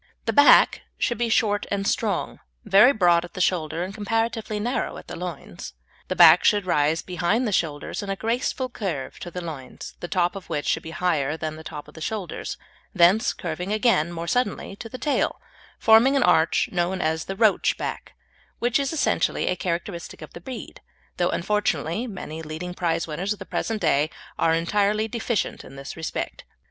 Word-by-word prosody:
The - - 0
back 285 0 +6 0.2
should 240 - -1
be 240 -1 +1
short 210 -2 +1
and 200 0 -1
strong, 205 -5 -1 0.3
very 215 +7 +7
broad 175 -8 +3
at 175 - -11
the - - -5
shoulder 170 -2 0
and 190 +2 -6
comparatively 225 0 -1
narrow 240 +5 -2
at - - -11
the - - -7
loins. - - -7 0.3
The - - -2
back - - +8
should 205 -2 +3
rise 155 -1 +1
behind 190 +7 0
the - - -1
shoulders 155 0 -1
in 200 - -6
a 195 - 0
graceful 245 +4 -1
curve 190 - -5
to 175 - -6
the 180 +1 -6
loins, 150 -7 -8
the 175 - -5
top 175 0 +1
of 195 - -9
which 145 - -2
should - - +1
be 160 - -8
higher 160 -4 0
than 155 -1 -4
the 160 - -10
top 150 -2 -8
of - - -15
the 160 - -11
shoulders, 205 +1 -4 0.4
thence 190 +7 +5
curving 175 +3 -5
again 215 -7 +2
more 170 0 -5
suddenly 205 -1 -1
to 225 - -8
the 255 - -7
tail, 290 +2 0 0.4
forming 225 +5 +5
an 275 - +3
arch 160 -2 +3
known 180 +1 0
as 160 -1 -1
the 195 - -5
"roach" 215 -1 +3
back, - - -5 0.4
which 240 +2 +1
is 275 -1 -1
essentially 320 - +1
a 180 - +1
characteristic 170 -2 -4
of 155 - -12
the 170 - -10
breed, 250 +7 -8 0.4
though, 175 0 +2
unfortunately, 195 - -1
many 160 -7 -7
leading 160 +3 -6
prize 170 -2 -1
winners 180 +6 -2
of - - -12
the - - -9
present 225 -1 -2
day 155 -2 +2 0.3
are 165 0 +3
entirely 205 +5 +1
deficient 225 -1 -2
in - - -12
this 135 0 -8
respect. 160 -2 -4
180 Hz, 190 wpm, -24 LUFS, 165-220 Hz, 0.4 s, back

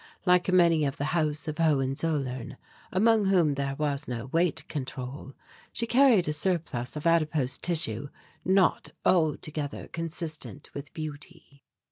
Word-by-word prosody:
Like 180 0 +4
many 170 -4 +5
of 140 -2 -1
the 145 +2 -2
House 155 -2 0
of 155 +1 -4
Hohenzollern, 135 -3 0 0.3
among 215 +2 +3
whom 175 -6 +4
there 140 0 -2
was 145 -1 -2
no 120 -1 -4
weight 165 +4 0
control, 135 -1 -6 0.4
she 230 - -1
carried 235 - +5
a 150 - +1
surplus 150 -7 -1
of 150 - -6
adipose 155 -5 +2
tissue 145 -7 0 0.3
not 190 -1 +2 0.2
altogether 155 -3 0
consistent 160 -3 -6
with 140 0 -7
beauty. 155 -1 -8
155 Hz, 130 wpm, -28 LUFS, 140-170 Hz, 0.4 s, many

